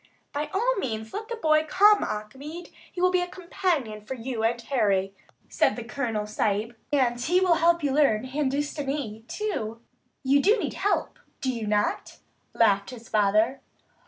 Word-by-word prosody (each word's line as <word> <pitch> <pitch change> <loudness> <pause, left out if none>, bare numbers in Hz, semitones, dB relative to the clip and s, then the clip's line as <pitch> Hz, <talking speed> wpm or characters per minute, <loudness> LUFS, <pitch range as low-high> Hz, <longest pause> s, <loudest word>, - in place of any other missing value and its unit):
"By 295 +1 -2
all 480 +5 +1
means 220 - -4
let 430 +2 -5
the 470 - -4
boy 310 -7 +3
come, 415 +5 +5
Achmed. 270 +11 -6 0.2
He 360 - -7
will 365 0 +4
be 365 -1 +2
a 355 - -2
companion 340 - -2
for 240 +6 -6
you, 240 -1 -4
Harry," 225 -5 +1 0.3
said - - +2
the 240 - -6
Colonel 230 -4 -2
Sahib. 215 +2 -1 0.2
"And 250 -4 +2
he 350 +8 +3
will 370 -2 +4
help 340 0 +3
you 285 - +1
learn 270 -7 +3
Hindustanee, 275 -4 -2
too. 230 - -3 0.4
You 275 +2 +4
need 425 +9 +2
help, 405 +1 -1 0.2
do 260 -1 -1
you 225 -3 -4
not?" 210 0 -1 0.4
laughed 200 -3 +3
his 235 -3 -11
father. 215 +5 +2
265 Hz, 160 wpm, -26 LUFS, 220-340 Hz, 0.4 s, come